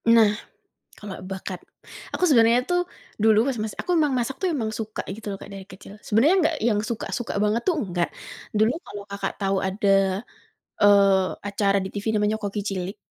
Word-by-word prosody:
Nah 220 Hz, -3 st, +6 dB, 0.7 s
kalau 205 Hz, -2 st, -7 dB, 0.2 s
bakat, 190 Hz, -1 st, -5 dB, 0.5 s
aku -, -, -2 dB
sebenarnya 235 Hz, -3 st, +5 dB
tuh 355 Hz, 0 st, +3 dB, 0.4 s
dulu 220 Hz, -1 st, +5 dB
mas 265 Hz, -3 st, -1 dB
mas 215 Hz, -, -4 dB
aku 360 Hz, -, -3 dB
emang 300 Hz, -3 st, +2 dB
masak 245 Hz, +2 st, -1 dB
tuh 380 Hz, -, +1 dB
emang 225 Hz, -7 st, -1 dB
suka 220 Hz, -1 st, -4 dB
gitu 220 Hz, -, -12 dB
loh 195 Hz, -, -4 dB
Kak -, -, -10 dB
dari 195 Hz, -1 st, -8 dB
kecil, 190 Hz, +1 st, -12 dB
sebenarnya 245 Hz, -, +4 dB
nggak 320 Hz, -, +2 dB
yang 210 Hz, -3 st, +2 dB
suka-suka 235 Hz, +1 st, -3 dB
banget 210 Hz, +3 st, +1 dB
tuh, 360 Hz, -, +3 dB
nggak. 175 Hz, -1 st, 0 dB, 0.5 s
Dulu 215 Hz, +2 st, +4 dB
kalau 205 Hz, 0 st, -8 dB
Kakak 200 Hz, -1 st, -3 dB
tahu 195 Hz, -1 st, +1 dB
ada, 200 Hz, +2 st, -2 dB, 0.9 s
eee, 200 Hz, -2 st, +5 dB, 0.2 s
acara 200 Hz, 0 st, +1 dB
di -, -, -4 dB
TV 205 Hz, +1 st, -5 dB
namanya 210 Hz, 0 st, +2 dB
Koki 205 Hz, 0 st, -2 dB
Cilik, 190 Hz, 0 st, -4 dB
210 Hz, 180 wpm, -24 LUFS, 195-230 Hz, 0.9 s, Nah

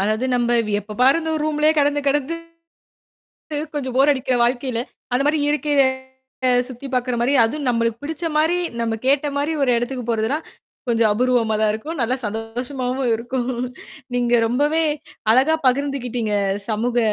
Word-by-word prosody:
அதாவது 215 Hz, +4 st, 0 dB
நம்ப 240 Hz, -1 st, 0 dB, 0.3 s
எப்ப 210 Hz, +1 st, -9 dB
பாரு 270 Hz, +5 st, +5 dB
அந்த 320 Hz, -, -3 dB
ஒரு 300 Hz, -, -2 dB
ரூம்லயே 305 Hz, 0 st, +3 dB
கெடந்து, 290 Hz, 0 st, +2 dB
கெடந்து, 290 Hz, +3 st, 0 dB, 1.4 s
கொஞ்சம் 260 Hz, -4 st, -3 dB
போர் 275 Hz, +2 st, +5 dB
அடிக்கிற 260 Hz, -2 st, 0 dB
வாழ்க்கையில, 245 Hz, 0 st, 0 dB, 0.3 s
அந்த 255 Hz, +3 st, +2 dB
மாரி 300 Hz, +1 st, +2 dB
இயற்கைய 295 Hz, -1 st, +2 dB, 0.9 s
சுத்தி 260 Hz, +2 st, -8 dB
பாக்குற 250 Hz, -1 st, 0 dB
மாரி, 250 Hz, +4 st, +2 dB
அதுவும் 270 Hz, +4 st, -1 dB
நம்மளுக்கு 230 Hz, 0 st, 0 dB
பிடிச்ச 320 Hz, +3 st, -5 dB
மாரி, 320 Hz, +3 st, +3 dB, 0.2 s
நம்ம 225 Hz, -1 st, 0 dB
கேட்ட 280 Hz, +2 st, +3 dB
மாரி 290 Hz, +3 st, 0 dB
ஒரு 265 Hz, -, +2 dB
இடத்துக்குப் 240 Hz, 0 st, -3 dB
போறதுன்னா, 225 Hz, +6 st, 0 dB, 0.5 s
கொஞ்சம் 230 Hz, -2 st, +3 dB
அபூர்வமாதான் 220 Hz, -2 st, +2 dB
இருக்கும். 310 Hz, +10 st, -5 dB
நல்லா 245 Hz, +3 st, +1 dB
சந்தோஷமாவும் 245 Hz, +4 st, -3 dB
இருக்கும். 240 Hz, +2 st, -2 dB, 0.7 s
நீங்க 245 Hz, -1 st, +1 dB
ரொம்பவே 295 Hz, +7 st, +1 dB, 0.5 s
அழகா 270 Hz, +7 st, +4 dB
பகிர்ந்துக்கிட்டீங்க. 250 Hz, -4 st, 0 dB, 0.3 s
சமூக 235 Hz, +2 st, -1 dB
255 Hz, 140 wpm, -21 LUFS, 235-285 Hz, 1.4 s, பாரு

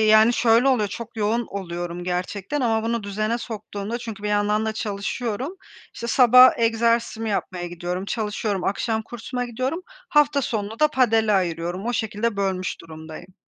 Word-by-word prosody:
yani, 215 Hz, +1 st, +6 dB
şöyle 235 Hz, +2 st, +4 dB
oluyor 220 Hz, -6 st, +2 dB
çok 225 Hz, +3 st, -8 dB
yoğun 220 Hz, +2 st, 0 dB
oluyorum 175 Hz, -2 st, -5 dB
gerçekten 185 Hz, +9 st, -2 dB
ama 225 Hz, -3 st, +1 dB
bunu 230 Hz, -1 st, -1 dB
düzene 215 Hz, +3 st, -1 dB
soktuğunda 215 Hz, -1 st, -5 dB
çünkü 225 Hz, -4 st, -7 dB
bir 210 Hz, -, -2 dB
yandan 210 Hz, +1 st, +1 dB
da 220 Hz, -, 0 dB
çalışıyorum. 220 Hz, -, -3 dB, 0.4 s
İşte, 235 Hz, -, -5 dB
sabah 250 Hz, +1 st, +8 dB
egzersizimi 230 Hz, -1 st, +1 dB
yapmaya 180 Hz, -3 st, -2 dB
gidiyorum. 175 Hz, +2 st, -4 dB
Çalışıyorum 210 Hz, -2 st, -2 dB
akşam 220 Hz, +2 st, -1 dB
kursuma 245 Hz, +2 st, -5 dB
gidiyorum. 255 Hz, +8 st, -3 dB
Hafta 295 Hz, -, +1 dB
sonunu 220 Hz, 0 st, -3 dB
da 305 Hz, -, +6 dB
padele 225 Hz, -6 st, +3 dB
ayırıyorum. 175 Hz, +1 st, -1 dB
O 240 Hz, -, 0 dB
şekilde 220 Hz, -1 st, -1 dB
bölmüş 190 Hz, -2 st, -2 dB
durumdayım. 160 Hz, +3 st, -11 dB
220 Hz, 150 wpm, -23 LUFS, 200-235 Hz, 0.4 s, sabah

